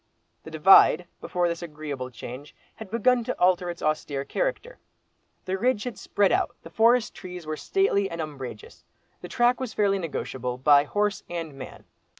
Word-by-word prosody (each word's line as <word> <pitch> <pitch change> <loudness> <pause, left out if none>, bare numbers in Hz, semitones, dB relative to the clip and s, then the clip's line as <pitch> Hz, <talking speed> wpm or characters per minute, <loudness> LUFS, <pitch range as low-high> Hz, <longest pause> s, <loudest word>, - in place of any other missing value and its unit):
The - - -11
"Divide," 165 +1 +6
before 175 -1 -1
this 170 0 -3
agreeable 150 -5 -6
change, 125 +4 -10 0.2
had 220 -3 -9
begun 235 +3 +2
to - - -4
alter 180 0 +3
its 170 - -7
austere 145 -2 -1
character. - - -3 0.7
The 190 +1 -2
ridge 245 -2 +1
had 245 -2 -5
spread 200 -2 +1
out, - - 0
the - - -11
forest 230 +1 +3
trees 180 -3 -9
were 155 0 -3
stately 200 - +1
and 170 - -7
umbrageous, 150 - -8 0.4
the - - -7
track 245 +1 +2
was 255 -4 -5
fairly 200 -2 +2
negotiable 130 -7 -4
by 140 +2 +5
horse 205 +5 -1
and 165 -3 -5
man. 135 -1 -10
180 Hz, 165 wpm, -26 LUFS, 150-220 Hz, 0.7 s, Divide